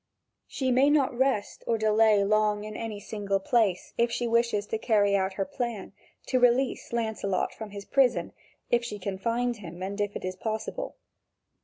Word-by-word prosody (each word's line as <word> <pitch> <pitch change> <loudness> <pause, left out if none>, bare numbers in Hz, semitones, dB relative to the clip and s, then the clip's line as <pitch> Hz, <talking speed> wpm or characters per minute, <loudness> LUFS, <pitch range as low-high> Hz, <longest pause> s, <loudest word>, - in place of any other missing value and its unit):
She 260 -2 -1
may 265 +3 +5
not 280 -4 +2
rest 255 -5 0
or 230 - +2
delay 215 -1 +4
long 210 0 +2
in 215 0 -7
any 220 -3 -5
single 200 -1 -2
place, 200 -3 +1
if 235 0 +4
she 240 - -1
wishes 235 -3 +1
to 220 - -3
carry 205 -4 +3
out 190 0 0
her 195 0 -2
plan, 235 -3 -4 0.3
to 255 - +1
release 245 +1 +2
Lancelot 220 -5 -1
from 220 -1 -8
his 200 0 -8
prison, 265 -3 +2 0.4
if 240 0 +3
she 225 -3 -5
can 190 -1 -4
find 240 +2 0
him 180 -2 -8
and 200 +2 -3
if 205 0 -2
it - - -5
is 185 0 -3
possible. 220 - -4
220 Hz, 180 wpm, -28 LUFS, 200-240 Hz, 0.4 s, may